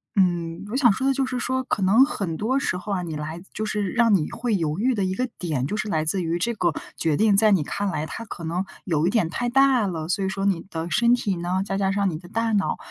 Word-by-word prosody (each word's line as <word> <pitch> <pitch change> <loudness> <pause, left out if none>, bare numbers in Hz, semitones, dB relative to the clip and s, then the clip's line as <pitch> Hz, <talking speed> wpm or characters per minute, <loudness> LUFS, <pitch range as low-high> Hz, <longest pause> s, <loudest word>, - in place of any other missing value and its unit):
嗯， 175 -3 +1
我 - - -3
想 255 -4 +5
说 260 +7 -1
的 275 - +3
就 270 0 0
是 255 -1 -3
说， 260 +1 -1
可 220 -5 -2
能 210 +8 +6
很 195 - -2
多 245 +10 0
时 190 - -1
候 195 +3 -6
啊， 185 -2 -1
你 160 -3 -5
来 155 +3 -5
就 215 - -3
是 210 -3 -1
让 235 -2 +3
你 155 -5 0
会 240 -3 -2
犹 160 -2 -1
豫 250 +5 +2
的 200 -4 0
一 185 - -1
个 255 +3 -1
点， 150 -8 -2
就 210 +9 -2
是 215 - -2
来 155 -5 0
自 180 +4 0
于 165 0 -1
这 235 +6 0
个 175 -5 +1 0.2
决 160 -3 +1
定 210 0 +3
在 215 0 +5
你 185 -6 +3
看 200 +6 -3
来， 155 -4 -2
它 230 - -7
可 175 - -8
能 175 +4 -2 0.2
有 165 -2 +1
一 - - +3
点 205 -7 +1
太 240 +7 -2
大 260 -3 +4
了， 160 -2 -4
所 195 +1 0
以 - - 0
说 195 +1 -2
你 190 -4 +1
的 165 +1 -4
身 235 +8 +3
体 200 -7 -2
呢， 180 +2 -1
再 195 -1 -2
加 195 -1 +1
上 200 -1 +1
你 155 - -4
的 175 +1 -13
大 225 +3 -1
脑， 200 -2 +1
195 Hz, 300 characters per minute, -24 LUFS, 170-225 Hz, 0.2 s, 能